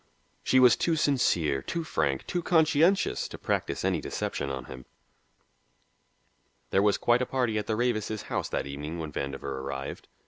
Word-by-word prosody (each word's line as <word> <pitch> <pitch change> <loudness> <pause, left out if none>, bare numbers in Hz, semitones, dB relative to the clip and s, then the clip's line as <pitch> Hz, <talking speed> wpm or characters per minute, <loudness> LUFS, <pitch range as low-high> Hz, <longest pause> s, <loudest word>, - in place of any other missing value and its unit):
She 130 - +3
was 125 -2 +7
too 165 - +1
sincere, 90 - +2
too 170 - -3
frank, 75 - -1
too 175 - -2
conscientious 165 +2 +3
to - - -9
practise - - -2
any - - +1
deception 70 - -3
on 65 -2 -5
him. 65 -1 -10 1.8
There 95 - +4
was 105 -1 +3
quite 120 +1 +3
a 125 - -1
party 120 -5 0
at 105 - -5
the 110 - 0
Ravises' 110 -2 -1
house - - -3
that - - -2
evening 75 +4 -5
when 80 -2 -5
Vandover 70 -1 -4 0.2
arrived. 70 0 -6
105 Hz, 165 wpm, -28 LUFS, -, 1.8 s, was